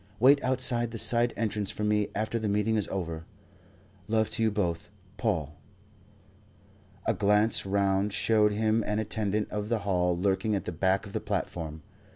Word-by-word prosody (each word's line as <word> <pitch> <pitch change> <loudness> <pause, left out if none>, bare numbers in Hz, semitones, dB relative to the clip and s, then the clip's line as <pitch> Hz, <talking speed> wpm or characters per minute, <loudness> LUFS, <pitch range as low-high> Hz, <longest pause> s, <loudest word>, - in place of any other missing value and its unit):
Wait 140 +4 +5
outside 125 -2 +3
the 115 - -7
side 120 +2 +3
entrance 105 -3 -1
for 105 - -4
me 105 -1 +1
after 110 +3 -1
the 110 - -2
meeting 105 +2 +1
is 105 -3 0
over. 85 -4 -4 0.8
Love 110 0 +1
to 110 - -1
you 110 - +3
both. 90 -5 -2 0.3
Paul." 80 - -1 1.5
A - - +2
glance 105 +1 +2
round 100 +1 +1
showed 110 0 +2
him 110 +1 +1
an 105 - 0
attendant 105 -1 -2
of 105 0 -3
the 115 - +1
hall 90 -3 +1
lurking 100 +3 0
at 100 - -3
the - - -3
back 95 +4 0
of 100 - -11
the - - -2
platform. 80 -2 -4
105 Hz, 170 wpm, -28 LUFS, 95-110 Hz, 1.5 s, Wait